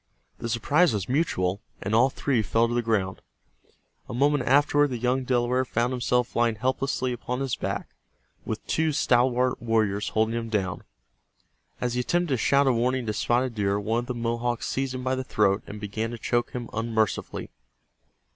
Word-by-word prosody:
The 115 - -4
surprise 145 +7 +3
was 100 -3 -3
mutual, 105 - 0 0.2
and 100 - -3
all 120 +4 +5
three 130 -3 0
fell 115 +3 +2
to 120 - -3
the 120 - +1
ground. 105 -5 -1 0.9
A - - -4
moment 140 0 +2
afterward 145 +2 +4
the 125 -3 -4
young 125 +2 0
Delaware 125 0 +1
found 120 0 -1
himself 125 -1 0
lying 120 -1 +2
helplessly 130 +2 -1
upon 125 +1 -4
his 135 -2 -1
back - - -3 0.6
with - - -5
two 160 -1 +1
stalwart 125 -1 +2
warriors 110 -3 +1
holding 110 +1 +1
him 115 -1 -3
down. 95 -4 -1 1.0
As 125 -1 -1
he 125 - -1
attempted 175 +7 0
to - - +2
shout 140 +5 +3
a 130 - +4
warning 125 +2 0
to 110 - -1
Spotted 120 +4 +1
Deer 100 -2 0
one 110 +3 0
of 120 - -4
the 125 - -3
Mohawks 120 0 -1
seized 135 -1 -2
him 125 - -5
by 130 0 0
the 130 0 -2
throat 100 -5 +2
and 105 - -7
began 110 +2 -3
to 120 - -6
choke 120 +1 0
him 120 -2 -5
unmercifully. 110 -2 -1
120 Hz, 185 wpm, -26 LUFS, 110-130 Hz, 1.0 s, all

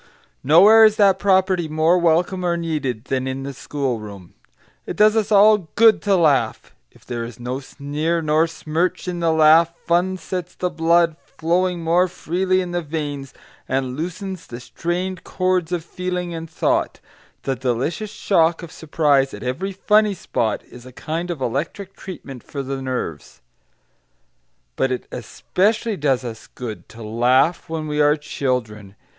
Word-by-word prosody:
Nowhere 195 +10 +7
is 215 -1 +6
that 200 -3 +4
property 190 -3 +2
more 160 +3 +2
welcome 175 +2 +1
or 175 -1 +1
needed 150 -9 -3
than 130 -1 -2
in 130 +1 -4
the 140 0 -5
schoolroom. 110 -10 -5 0.5
It - - -4
does 215 +1 +5
us 220 -1 0
all 205 -4 +5
good 225 -1 +5
to 200 -1 +2
laugh, 155 -6 +1 0.2
if - - -23
there 120 -1 -4
is 115 0 -9
no 125 +2 -4
sneer 150 +4 -3
nor 155 +1 +2
smirch 165 +3 -2
in 175 -1 -3
the 165 -1 +2
laugh; 160 +1 +5
fun 180 +2 +1
sets 180 +1 -6
the 180 -1 -2
blood 165 0 +2
flowing 175 +1 -1
more 175 +3 +3
freely 185 +2 -1
in 180 -1 -5
the 175 0 -1
veins, 145 -4 -5 0.4
and 130 -1 -1
loosens 180 +4 -5
the 120 - -8
strained 175 +8 -4
cords 185 -2 -1
of 170 -2 -2
feeling 180 -1 -4
and 165 0 -6
thought; 160 - 0 0.4
the 135 - -1
delicious 130 - -2
shock 170 -5 +1
of 165 - -9
surprise 145 -5 +1
at 105 - -10
every 135 +11 -3
"funny 210 +1 +2
spot" 110 - -2
is 125 - -14
a 130 - -12
kind 165 +7 -4
of 170 -4 -4
electric 160 - -3
treatment 140 -9 -9
for 140 -2 -6
the 135 0 -4
nerves. 125 - -5 1.4
But 130 - 0
it 125 - -3
especially 210 - -1
does 140 -6 0
us 115 -2 -8
good 115 -4 -8
to 115 0 -11
laugh 125 +11 +2
when 160 -1 -3
we 150 0 0
are 150 0 +4
children. 110 -9 -3
160 Hz, 160 wpm, -21 LUFS, 135-180 Hz, 1.4 s, Nowhere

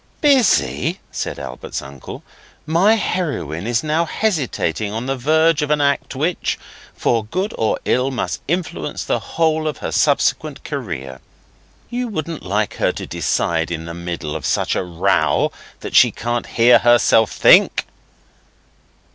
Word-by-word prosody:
'Busy?' 240 - +2
said - - -4
Albert's - - -6
uncle. 70 0 -10 0.4
'My 175 +8 +4
heroine 140 - -2
is 120 +3 0
now 155 +2 +1
hesitating 130 - -1
on 115 +3 -4
the 135 +1 -1
verge 155 +4 +2
of 150 - -1
an 150 0 +2
act 140 -1 0
which, 160 +6 -1 0.4
for 115 -2 +1
good 185 - -3
or 110 - 0
ill, 125 +2 +1
must 130 - -3
influence 160 - -3
her - - +1
whole 160 -1 0 0.2
subsequent 150 0 +1
career. 80 - -5 0.7
You 245 +1 -2
wouldn't 165 -6 -4
like 100 +3 -2
her - - +2
to - - -7
decide 80 -1 -1
in 80 -1 -4
the 85 - -6
middle 85 -3 -5
of - - -5
such - - 0
a - - 0
row 85 -4 +1 0.3
that - - -6
she - - +7
can't 120 +1 -3
hear 120 0 +5
herself 120 -2 +4
think? - - +5
125 Hz, 140 wpm, -19 LUFS, -, 0.7 s, she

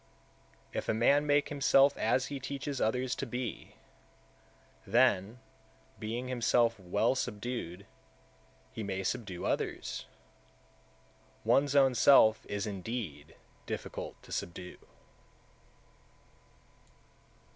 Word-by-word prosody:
159. - - -5
If - - -6
a - - +2
man 145 +6 +4
make 145 0 +3
himself 140 -1 +4
as 130 - +1
he 140 0 -5
teaches 140 +1 -4
others 125 +3 0
to 135 - -4
be, 125 0 -5 1.1
then, 100 +6 +3 0.6
being 115 +4 -4
himself 120 -2 +2
well 95 +6 +1
subdued, 105 -6 -4 0.9
he - - -6
may 95 -2 -3
subdue 95 -2 -3
(others); - - -3 1.4
one's 140 +1 +3
own 135 -2 +5
self 110 -4 +5
is 105 +1 -3
indeed 95 - -5 0.3
difficult - - -6
to - - -15
subdue. 90 +1 -5
120 Hz, 100 wpm, -31 LUFS, 100-135 Hz, 1.4 s, own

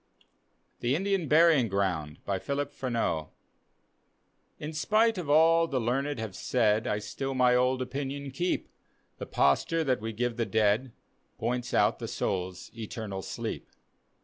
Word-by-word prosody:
THE 120 +3 +1
INDIAN 195 -1 0
BURYING 155 -5 +5
GROUND: 90 -7 -1
phiuf 140 +9 -2
PRBHBAU 115 - -1 1.3
In 155 +1 -6
spite 215 +6 +2
of 160 -5 -5
all 165 +2 +5
the 135 -5 -1
learned 135 +4 -1
have 110 -4 -5
said, 110 -3 +1
I 105 - 0
still 135 +6 -4
my 125 -1 +4
old 130 +1 +2
opinion 140 +1 -4
keep; 175 +7 -1 0.5
The - - -5
posture 160 - +2
that 130 -6 0
we 110 +1 -3
give 120 +1 -2
the 115 - 0
dead 110 +3 +2 0.5
Points 125 0 -2
out - - +3
the - - -4
soul's 90 -1 -3
eternal 110 -3 -5
sleep. - - -5
125 Hz, 140 wpm, -29 LUFS, 105-145 Hz, 1.3 s, BURYING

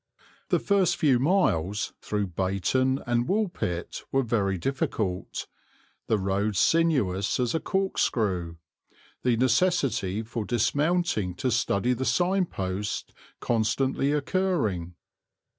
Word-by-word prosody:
The - - +3
first 190 -4 +2
few 135 -5 +3
miles, 105 - +1
through 105 -1 -1
Bayton 100 - 0
and 120 0 0
Woolpit, 180 - -2
were 135 0 +2
very 100 -5 0
difficult, 100 -4 -2 0.6
the 110 - +2
road 100 +2 -1
sinuous 125 - +2
as 125 -2 0
a 160 - +1
corkscrew, 105 - 0 0.7
the 125 -2 +2
necessity 125 - +1
for 115 0 -4
dismounting 125 - 0
to 130 - -1
study 120 +1 +1
the 130 +2 -3
sign 185 +3 +2
posts 95 0 -4 0.3
constantly 130 +4 +1
occurring. 145 - 0
120 Hz, 110 wpm, -27 LUFS, 100-150 Hz, 0.7 s, The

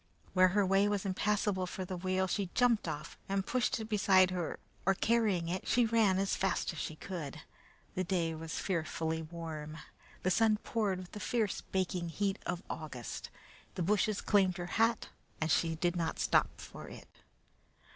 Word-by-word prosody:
Where 185 0 +6
her 200 +2 +2
way 195 +2 +4
was 205 -1 -1
impassable 195 -1 0
for 185 +1 -5
the 185 - -4
wheel, 185 +1 0
she 190 0 -1
jumped 245 -3 +3
off, 150 +2 -5
and 195 -1 0
pushing 245 -3 0
it - - -14
beside 190 -3 +5
her 175 -3 -2 0.3
or 195 +1 +3
carrying 215 -6 +2
it, 185 +2 -3
she 245 -1 +4
ran 220 -4 +3
as 195 0 +1
fast 195 -2 0
as 160 - -7
she 155 - -4
could. 160 -5 -6 0.5
The 185 - -1
day 170 -3 0
was 160 0 -5
fearfully 160 -2 -1
warm. 160 -2 -6 0.5
The 185 - +2
sun 220 +2 +4
poured 210 -5 0
with 180 -1 -9
the 210 - -7
fierce 220 0 0
baking 180 -2 -2
heat 195 +4 -1
of 175 +1 -2
August. 135 -7 -6 0.5
The 180 - -1
bushes 210 +2 +2
claimed 190 -3 +3
her 175 - -3 0.2
hat, 230 0 +2 0.3
and 160 0 0
she 165 -1 +2
did 175 +2 0
not 165 -2 -1
stop - - +2
for - - -9
it. - - -11
185 Hz, 175 wpm, -33 LUFS, 170-205 Hz, 0.5 s, Where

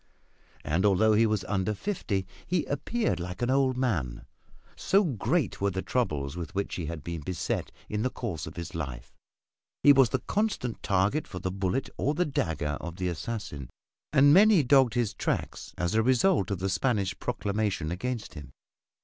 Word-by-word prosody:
And 80 +5 0
although 105 +2 +4
he 115 +2 +4
was 105 -3 0
under 100 +1 -1
fifty, 100 - -2 0.2
he 175 -3 0
appeared 220 - -1
like 90 +5 -5
an 120 - +1
old 130 -1 +2
man, 85 - -1 0.5
so 200 +2 +3
great 130 - -1
were 100 - +2
the 95 0 -3
troubles 75 - -1
with 85 -1 -6
which 100 0 -2
he 85 -4 -3
had 80 -3 -6
been 85 -1 -5
beset 90 +3 -3 0.2
in 105 0 -2
the 130 - +1
course 90 - -5
of 80 - -9
his 85 -1 -6
life. 65 -7 -6 0.7
He 145 - +9
was 135 -3 +5
the 130 - +1
constant 200 - -2
target 100 +9 +1
for 90 - -8
the 90 0 -3
bullet 95 +6 -1
or 145 +3 0
the 180 +3 +2
dagger 80 - -2
of 85 0 -6
the 90 -1 -2
assassin, 85 - -5 0.4
and 145 0 +6
many 200 -2 +6
dogged 130 -2 +4
his 115 -4 0
tracks - - -3
as 85 0 -1
a 110 - +4
result 130 - +3
of 100 - -1
the 95 +3 -2
Spanish 100 -2 0
proclamation 100 -6 -1
against 115 +5 -4
him. 70 -4 -10
105 Hz, 180 wpm, -28 LUFS, 85-130 Hz, 0.7 s, He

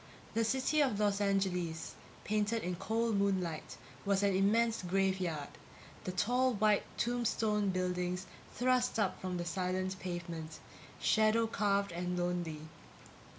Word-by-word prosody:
The 230 - +2
city 265 +6 +2
of 250 -8 +1
Los 205 -1 +2
Angeles, 180 -5 0 0.3
painted 215 +2 0
in 180 0 -2
cold 225 +2 0
moonlight, 185 -5 -1 0.3
was 200 -1 +2
an 200 -2 +3
immense 225 +4 +3
graveyard; 185 -5 0 0.6
the 185 - -1
tall 245 +7 +2
white 210 0 +4 0.2
tombstone 220 -4 +1
buildings 180 0 -1 0.3
thrust 250 -1 +2
up 195 -4 0
from 185 -1 -2
the 175 - -3
silent 185 +1 -2
pavement, 170 -3 -5 0.4
shadow 220 +1 +3
carved 200 -3 +1
and 180 +1 -2
lonely. 175 -3 -2
195 Hz, 125 wpm, -34 LUFS, 180-220 Hz, 0.6 s, white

